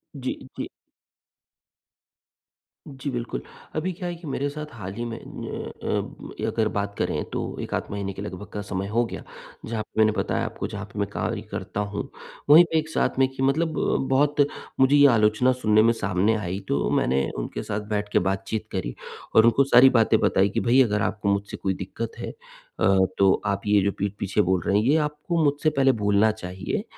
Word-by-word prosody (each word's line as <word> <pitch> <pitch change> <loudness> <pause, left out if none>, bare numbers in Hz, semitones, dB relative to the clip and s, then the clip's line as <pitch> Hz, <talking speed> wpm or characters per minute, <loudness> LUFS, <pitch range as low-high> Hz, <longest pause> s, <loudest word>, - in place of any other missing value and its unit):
जी, 130 -2 -3 0.2
जी। - - -4 2.2
जी, 140 +1 -6
बिल्कुल। 120 -2 -4 0.3
अभी 165 +4 -1
क्या 180 +1 -5
है 175 - -4
कि 170 -1 -11
मेरे 140 0 -1
साथ 150 +1 -6
हाल 95 -5 -7
ही 120 +4 -4
में 115 -1 -5
न्य - - -6
अ, - - -3
अगर 110 -2 +1
बात 100 0 -2
करें - - -1
तो - - -4
1 - - -6
आध - - 0
महीने 100 -1 -3
के 95 - -8
लगभग 100 0 -7
का 105 - -3
समय 100 -1 -4
हो 115 +4 +1
गया, - - -7 0.4
जहाँ 110 -1 -3
पे 110 - -7
मैंने 110 0 +5
बताया 110 - -1
आपको - - -4
जहाँ - - -6
पे - - -5
मैं - - 0
कार्य - - -3
करता - - -4
हूँ, 105 0 -3 0.4
वहीं 155 +4 +10
पे 160 - +2
एक 155 0 -1
साथ 160 - 0
में 135 - +5
कि 135 0 -4
मतलब 160 +4 +1 0.4
बहुत 145 +2 +3 0.3
मुझे 135 +2 +5
ये 145 0 +7
आलोचना 110 +1 +3
सुनने 110 -4 +3
में 115 +1 +4
सामने 100 0 +1
आई 95 -3 -3
तो 70 - 0
मैंने 65 +1 +1
उनके - - -4
साथ 105 - -3
बैठ 105 -1 -1
के - - +5
बातचीत 95 +3 -2
करी। - - -3 0.4
और 110 - +7
उनको 115 +4 +5
सारी 135 -1 +7
बातें 115 -3 +3
बताई 100 -3 +3
कि - - -1
भई 125 +2 +4
अगर 105 -3 0
आपको 105 0 -1
मुझसे 100 0 -4
कोई 95 - -1
दिक्कत 100 +5 -5
है - - -4
अ, 95 -1 0
तो 95 -1 +4
आप 100 -1 0
ये 105 -1 +4
जो 100 +1 +1
पीठ-पीछे 100 0 -1
बोल 95 -1 +1
रहे 100 - +3
हैं 105 - +2
ये 140 +5 +4
आपको 150 +2 -1
मुझसे 145 +1 +2
पहले 135 -3 +3
बोलना 105 +2 +4
चाहिए 95 - -4
110 Hz, 200 wpm, -25 LUFS, 100-135 Hz, 2.2 s, वहीं